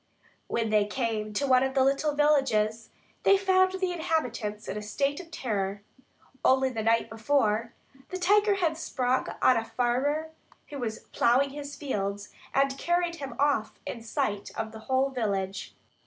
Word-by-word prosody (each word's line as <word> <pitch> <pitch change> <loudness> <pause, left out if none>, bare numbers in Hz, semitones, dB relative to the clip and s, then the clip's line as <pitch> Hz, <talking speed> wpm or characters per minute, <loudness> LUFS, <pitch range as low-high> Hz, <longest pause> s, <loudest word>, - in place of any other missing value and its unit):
When 225 -2 -1
they 210 -1 +4
came 220 -3 -2
to 280 +7 0
one 255 -2 +5
of 265 0 -1
the 265 - +4
little 280 +2 +1
villages, 230 -7 +2 0.3
they 395 - +5
found 375 -1 +3
the 375 -1 -1
inhabitants 250 -11 -2
in 190 - -4
a 210 - -4
state 275 +7 -1
of 350 -3 -10
terror. 205 -9 -3 0.6
Only 265 0 +4
the 225 -3 -3
day 225 +1 +3
before, 225 -1 0 0.4
the 370 - -4
tiger 405 +3 +4
had 330 -5 0
sprung 255 -4 0 0.2
on 255 - +6
a 225 - 0
farmer 255 +7 0 0.4
who 285 - -6
was 225 -3 -4
ploughing 265 +4 +3
his 285 0 -7
fields 205 -7 -3 0.2
and 275 0 +1
carried 345 0 0
him 270 -5 -6
off 285 -6 +1
in 235 - -5
sight 210 -2 -2
of 220 - -3
the 220 - -9
whole 265 +1 +2
village. 195 -5 -3
260 Hz, 165 wpm, -28 LUFS, 220-295 Hz, 0.6 s, on